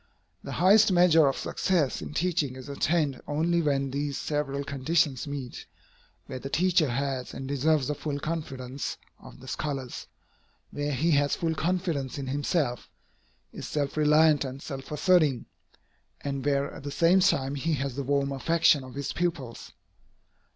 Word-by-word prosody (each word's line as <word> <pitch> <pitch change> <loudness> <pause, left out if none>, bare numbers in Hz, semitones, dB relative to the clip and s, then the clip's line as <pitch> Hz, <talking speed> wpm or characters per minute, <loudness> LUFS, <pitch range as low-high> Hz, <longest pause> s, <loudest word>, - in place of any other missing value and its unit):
The - - -6
highest 200 +4 +5
measure 170 -4 +5
of 135 - 0
success 165 -9 0
in 150 - -7
teaching 165 -7 0
is 130 -1 -9
attained 145 -1 0
only 165 +3 +1
where 145 -3 +2
these 140 +1 -2
several 145 -2 -2
conditions 140 0 0
meet, 140 -4 -6 0.6
where 130 -2 -6
the 135 - -6
teacher 170 -1 +2
has 135 0 -3
and 135 - -6
deserves 140 0 +1
the 150 - 0
full 145 -1 -4
confidence 140 -4 -4 0.2
of - - -14
the 130 - -13
scholars, 135 -3 -4 0.6
where 145 0 -2
he 160 +6 +1
has 145 -1 +3
full 165 -1 -1
confidence 165 -6 -1
in 140 - -4
himself, 140 -1 -1 0.6
is - - -7
self 145 -2 -2
reliant 150 0 +4
and 135 +1 -7
self 135 -1 -7
asserting, 150 -6 +3 0.8
and 140 -2 -3
where 140 0 0
at - - -9
the 145 - -5
same 170 +6 +4
time 135 -7 +2
he 155 +4 -1
has 135 -2 -3
the 140 - -2
warm 140 +1 0
affection 155 +1 +3
of 130 0 -11
his 140 -1 -3
pupils. 160 -9 -3
145 Hz, 160 wpm, -27 LUFS, 135-160 Hz, 0.8 s, highest